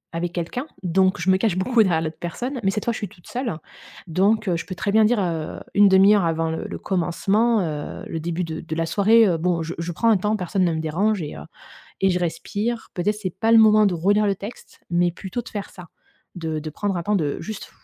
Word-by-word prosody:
avec 170 +1 -2
quelqu'un 175 - -4 0.2
donc 185 +2 +2
je 175 - -4
me 185 - +4
cache 195 -2 0
beaucoup 230 +5 +3
derrière 175 -6 +2
l'autre 160 0 -4
personne. 245 - -4
Mais 195 - +3
cette 210 +1 -3
fois, 235 - +1
je - - -5
suis 205 - -3
toute 175 -1 -20
seule 240 - -3 0.5
donc 200 +6 +2
heu, 180 - +2
je - - -6
peux 185 - -5
très 200 - -2
bien 220 +1 +5
dire, 230 +1 +2
heu, 165 -5 -3
1/2 200 0 +6
heure 200 - +2
avant 165 0 0
le 160 - -4
le - - -6
commencement, 200 +5 +1
heu, 150 -4 -4
le 165 - -4
début 170 +2 -2
de 160 -1 -5
de 160 -1 -5
la 165 0 0
soirée: 215 +6 +4
«Heu, 175 -3 +1
bon, 170 0 0
je 165 +1 -5
je 170 +1 -3
prends 230 +8 +1
un 215 - +4
temps, 210 +3 0
personne 185 0 -1
ne 170 - +1
me 160 - -2
dérange» 190 +6 0
et 150 - -6
heu - - -8 0.6
et 195 - +4
je 180 - +1
respire. 205 +6 -3
Peut-être, 205 +4 0
c'est 185 - -2
pas 225 +2 +2
le 230 - +8
moment 215 -1 +6
de 195 - +1
relire 200 +5 +2
le 200 - +2
texte, 200 +5 -10
mais 175 0 +2
plutôt 190 +7 -5
de 230 - -11
faire 205 -2 -5
ça. 180 -3 -12 0.5
De 160 -2 -3
de 155 0 -5
prendre 195 +4 -2
un 170 - -2
temps, 205 +4 +1
de 150 -6 -1
juste 215 -2 -7
185 Hz, 250 wpm, -23 LUFS, 170-210 Hz, 0.6 s, le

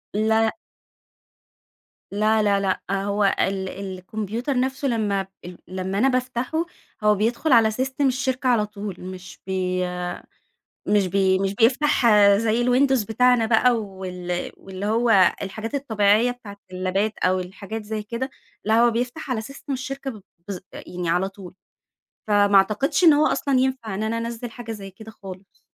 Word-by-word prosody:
لأ. 220 +1 +2 1.6
لا، 215 +2 +2
لا، 200 -1 +3
لأ 195 0 -1
هو 205 +1 0 0.2
ال 190 0 0
الكمبيوتر 210 +7 -4
نفسه 265 +2 -1
لمّا 205 -5 0 0.2
ال 180 0 -9
لمّا 185 +2 -4
أنا 245 +6 +3
بافتحه، 255 +5 -1 0.4
هو 210 0 +5
بيدخل 235 +9 0
على 225 -3 +6
سيستم 265 +4 0
الشركة 260 0 -1
على 230 -4 +3
طول، 205 -2 -7
مش 185 0 -9
بي 185 -1 -1 1.1
مش 205 -2 +3
بي 190 0 +2
مش 195 0 -1
بيفتح 255 +5 +3 0.3
زي 225 +1 +1
الويندوز 255 0 +3
بتاعنا 245 +2 +3
بقى 235 +2 +4
وال 185 -4 -5
واللي 190 +1 -7
هو 220 -3 +4
الحاجات 220 +6 -5
الطبيعية 220 -3 +2
بتاعة 215 -5 -11
اللابات 185 +3 -1
أو 185 0 +1
الحاجات 200 +4 -6
زي 215 0 -4
كده، 235 +5 -4 0.4
لا 220 +2 +3
هو 240 - +5
بيفتح 250 +4 -3
على 220 - -1
سيستم 275 +4 -7
الشركة 270 +1 -4
ب 215 -4 -12 0.3
بالض 195 -3 -5
يعني 175 -1 -5
على 180 +3 +1
طول، 190 -2 -12 0.7
فما 205 -1 +4
أعتقدش 215 - +3
إن 320 - +9
هو 295 +1 +4
أصلًا 275 -2 +1
ينفع 255 -5 -1
إن 200 - -3
أنا 220 +1 -1
أنزل 235 +1 -5
حاجة 230 0 -7
زي 200 -3 -8
كده 220 +4 -12
خالص، 195 -2 -12
215 Hz, 150 wpm, -23 LUFS, 195-245 Hz, 1.6 s, إن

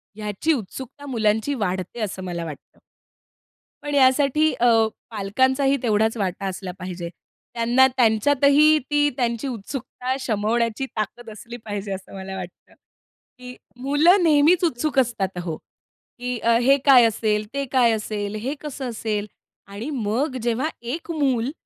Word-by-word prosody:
ह्याची 210 +9 -1
उत्सुकता 260 +4 -7
मुलांची 220 0 0
वाढते 190 -2 -3
असं 190 -3 -4
मला 175 -2 -4
वाटतं. 155 -3 -11 1.0
पण 290 0 -3
यासाठी 280 +3 +4
अ, 245 - 0 0.5
पालकांचाही 260 +7 +1
तेवढाच 220 0 +2
वाटा 195 -1 -2
असला 190 0 -5
पाहिजे. 180 -2 -6 0.4
त्यांना 240 +3 +4
त्यांच्यातही 280 +5 +4
ती 290 0 +3
त्यांची 235 0 -1
उत्सुकता 250 +2 -4
शमवण्याची 230 +1 0
ताकद 220 +2 -4
असली 230 +3 -9
पाहिजे, 205 -1 -4
असं 190 0 -9
मला 190 0 -6
वाटतं 180 -2 -10 0.7
की 250 0 -9 0.3
मुलं 310 +8 +4
नेहमीच 320 +3 +4
उत्सुक 300 -2 +1
असतात 230 -6 +1
अहो, 170 -3 -3
की 250 -1 -9
अ, 230 +1 +3
हे 270 +3 +4
काय 260 -4 +8
असेल? 215 -1 0
ते 280 0 -2
काय 245 -3 +4
असेल? 210 -1 -3
हे 240 +6 -3
कसं 275 -3 -5
असेल? 215 -2 -3 0.4
आणि 205 +7 -6
मग 255 +1 -1
जेव्हा 240 +6 0 0.2
1 335 +1 -5
मूल 270 -5 0
235 Hz, 135 wpm, -23 LUFS, 210-275 Hz, 1.0 s, काय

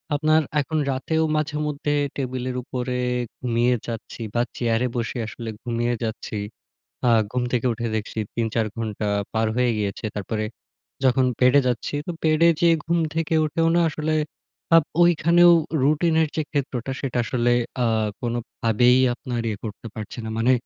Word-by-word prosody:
আপনার 155 +2 +3 0.2
এখন 155 +3 -3
রাতেও 160 +5 0
মাঝেমধ্যে 150 -1 -1 0.2
টেবিলের 130 -1 -3
উপরে 125 0 -3 0.4
ঘুমিয়ে 120 0 +2
যাচ্ছি 115 0 -6
বা 120 - +2 0.2
চেয়ারে 115 +1 +1
বসে 120 +1 -2
আসলে 115 +1 -7
ঘুমিয়ে 120 0 -1
যাচ্ছি। 110 -1 -4 0.7
আ - - +5 0.2
ঘুম 125 +1 -1
থেকে 125 0 +1
উঠে 115 +1 -4
দেখছি 110 +1 -5 0.2
৩-৪ 115 -1 0
ঘন্টা 110 -2 -3 0.3
পার 110 0 +1
হয়ে 125 -1 +3
গিয়েছে। 105 0 -3
তারপরে 105 +1 -3 0.6
যখন 130 0 +4 0.2
বেডে 130 +3 +6
যাচ্ছি, 125 +3 -1
তো - - -3
বেডে 160 +1 +4
যেয়ে 170 -1 +5
ঘুম 170 +1 +1 0.2
থেকে 165 0 0
উঠেও 165 +2 +1
না - - +4
আসলে 155 +1 -1 0.6
আপ 165 - +5 0.2
ঐখানেও 175 +1 +6 0.3
রুটিনের 160 +2 +3
যে 155 - +1
ক্ষেত্রটা 135 -3 -2
সেটা 130 -3 -2
আসলে 120 0 +1 0.3
আ - - +3 0.3
কোনভাবেই 120 0 +2 0.2
আপনার 120 -1 -4
ইয়ে 105 -2 -3
করতে 110 +1 -7
পারছি 110 +2 -7
না। - - -4
মানে 120 +3 +4
125 Hz, 150 wpm, -23 LUFS, 115-150 Hz, 0.7 s, বেডে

